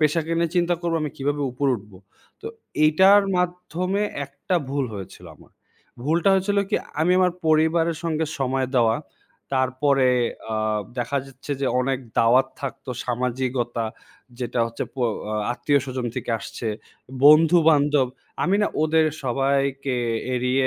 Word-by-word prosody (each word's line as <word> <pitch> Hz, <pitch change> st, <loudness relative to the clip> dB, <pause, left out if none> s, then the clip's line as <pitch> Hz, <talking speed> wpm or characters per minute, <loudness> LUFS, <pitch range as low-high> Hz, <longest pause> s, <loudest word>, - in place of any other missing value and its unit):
পেশাকে 160 Hz, +2 st, +1 dB
নিয়ে 170 Hz, -1 st, +1 dB
চিন্তা 175 Hz, 0 st, +2 dB
করবো 170 Hz, -1 st, -1 dB
আমি 150 Hz, -, -2 dB
কীভাবে 145 Hz, +1 st, -1 dB
উপরে 135 Hz, +2 st, 0 dB
উঠবো? 100 Hz, -3 st, -14 dB, 0.4 s
তো -, -, -6 dB, 0.4 s
এটার 190 Hz, +6 st, +6 dB
মাধ্যমে 180 Hz, +2 st, -1 dB, 0.2 s
একটা 140 Hz, +6 st, -4 dB, 0.2 s
ভুল 140 Hz, -1 st, 0 dB
হয়েছিল 95 Hz, -2 st, -9 dB
আমার। -, -, -20 dB, 0.5 s
ভুলটা 165 Hz, +7 st, +2 dB
হয়েছিল 200 Hz, +2 st, +1 dB
কি -, -, +1 dB, 0.2 s
আমি 175 Hz, +3 st, +3 dB
আমার 180 Hz, -1 st, +3 dB
পরিবারের 160 Hz, +1 st, +3 dB
সঙ্গে 160 Hz, -1 st, 0 dB
সময় 130 Hz, -1 st, 0 dB
দেওয়া 115 Hz, -2 st, +3 dB, 0.6 s
তারপরে 130 Hz, +1 st, +2 dB, 0.5 s
আ -, -, 0 dB, 0.4 s
দেখা 125 Hz, +4 st, -1 dB
যাচ্ছে 135 Hz, +2 st, -7 dB
যে 135 Hz, -, 0 dB
অনেক 130 Hz, 0 st, 0 dB, 0.2 s
দাওয়াত 125 Hz, +3 st, +5 dB
থাকতো 135 Hz, -1 st, -6 dB
সামাজিকতা 125 Hz, -1 st, -2 dB, 0.5 s
যেটা 125 Hz, -1 st, -3 dB
হচ্ছে 115 Hz, -, -5 dB
প -, -, -43 dB, 0.4 s
আ -, -, -1 dB, 0.2 s
আত্মীয়স্বজন 130 Hz, -2 st, -1 dB
থেকে -, -, -4 dB
আসছে, 115 Hz, -, -7 dB, 0.6 s
বন্ধু-বান্ধব 150 Hz, -3 st, +5 dB, 0.4 s
আমি 190 Hz, +3 st, +2 dB
না -, -, +3 dB, 0.2 s
ওদের 160 Hz, 0 st, +3 dB, 0.2 s
সবাইকে 135 Hz, +1 st, 0 dB, 0.4 s
এড়িয়ে 125 Hz, +1 st, +1 dB
140 Hz, 135 wpm, -23 LUFS, 130-165 Hz, 0.6 s, এটার